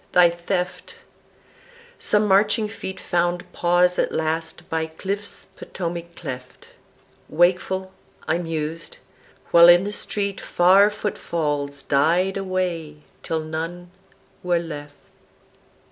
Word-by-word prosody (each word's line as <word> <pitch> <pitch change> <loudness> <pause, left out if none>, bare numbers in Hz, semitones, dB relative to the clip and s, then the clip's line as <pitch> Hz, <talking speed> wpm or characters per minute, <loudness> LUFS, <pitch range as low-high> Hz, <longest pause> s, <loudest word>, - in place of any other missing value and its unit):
thy 175 -1 +6
theft); 180 +1 -3 1.0
Some 210 0 +2
marching 210 +3 +3
feet 195 -3 -7
Found 175 0 -1
pause 180 +1 +2
at - - +1
last 160 +1 -2
by 160 0 -1
cliffs 195 +5 -5
Potomac 170 -1 -6
cleft; 125 0 -8 0.6
Wakeful 185 +3 +1 0.3
I 170 - +1
mused, 165 -1 -4 0.5
while 170 0 +9
in 175 +1 +7
the 205 - -3
street 200 -1 -3
Far 190 +4 +5
footfalls 150 -9 -3
died 170 +7 +2
away 180 -6 -3 0.2
till 160 -1 -2
none 165 +3 -5 0.5
were 175 -1 +1
left. 150 -3 -6
175 Hz, 105 wpm, -23 LUFS, 160-190 Hz, 1.0 s, while